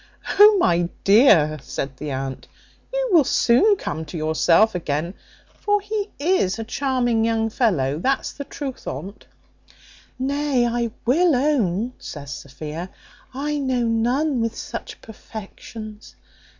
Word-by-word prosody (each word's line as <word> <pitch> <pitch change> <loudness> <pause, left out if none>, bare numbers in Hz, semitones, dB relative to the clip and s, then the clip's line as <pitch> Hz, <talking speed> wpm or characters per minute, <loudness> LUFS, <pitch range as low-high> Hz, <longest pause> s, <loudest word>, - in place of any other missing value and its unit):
"O, 420 0 +9
my 175 - +2
dear," 195 - +5
said 135 -1 -5
the 150 - -5
aunt, 135 -1 -5 0.4
"you - - -1
will 335 -5 +6
soon 320 - +4
come 160 - -5
to 160 +3 -7
yourself 165 +7 +3
again; 165 0 -2 0.5
for 415 0 +2
he 410 0 -3
is 285 - +1
a 225 - -4
charming 245 -2 0
young 225 -1 0
fellow, 155 - +1
that's 265 +9 -1
the 285 - -6
truth 275 -2 -7
on't." 180 +10 -7 0.9
"Nay, 275 -1 0
I 235 0 -1 0.2
will 315 +5 +3
own," 245 - 0
says 145 -2 -8
Sophia, 150 +7 -7 0.5
"I 295 +2 -2
know 260 -3 0
none 245 +4 +1
with 230 0 -2
such 445 -3 -7
perfections. 215 0 -10
230 Hz, 130 wpm, -22 LUFS, 170-280 Hz, 0.9 s, O